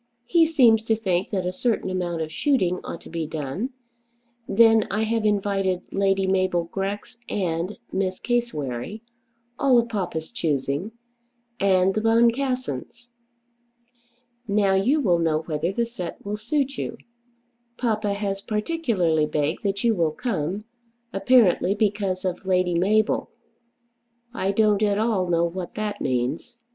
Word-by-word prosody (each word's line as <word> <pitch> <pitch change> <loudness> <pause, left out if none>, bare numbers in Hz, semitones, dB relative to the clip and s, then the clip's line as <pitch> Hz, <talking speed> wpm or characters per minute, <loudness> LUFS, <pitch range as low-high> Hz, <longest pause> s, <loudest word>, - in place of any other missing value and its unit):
He 330 +5 +4
seems 245 -8 +5
to 225 - +2
think 190 -3 -1
that 190 -4 -2
a 180 - 0
certain 225 -3 -1
amount 175 -3 -2
of 155 - -7
shooting 185 - +1
ought 170 - -7
to - - -13
be 165 -2 -3
done. 155 - -3 0.8
Then 225 0 +5
I 215 +2 0
have 225 0 0
invited 195 -3 0
Lady 195 0 +1
Mabel 185 -2 +1
Grex 195 +6 -5
and 175 0 -2
Miss 190 -1 -1
Cassewary, 215 - -2 0.6
all 265 -3 +4
of 235 0 +2
papa's 175 -7 -3
choosing, 150 - -1 0.7
and 190 -1 +3
the 215 - -1
Boncassens. 235 - 0 1.4
Now 200 -1 +2
you 235 +11 +3
will 180 -9 +3
know 160 -1 +1
whether 160 +2 -2
the 235 +4 0
set 185 -8 -7
will 205 +1 -2
suit 270 +5 -1
you. - - -4 0.8
Papa 215 -4 0
has 200 -1 -3
particularly 210 - 0
begged 150 +1 -1
that 200 -1 -2
you 235 -1 +4
will 165 -6 +1
come, 190 - -2 0.5
apparently 200 -3 +4
because 200 -3 0
of 185 - -2
Lady 180 -1 +2
Mabel. 205 +5 +2 1.0
I 195 -5 0
don't 210 0 +3
at 205 -1 +2
all 210 -5 +1
know 170 0 +3
what 175 +1 -5
that 210 -1 -3
means. 135 - -2
195 Hz, 140 wpm, -24 LUFS, 175-225 Hz, 1.4 s, seems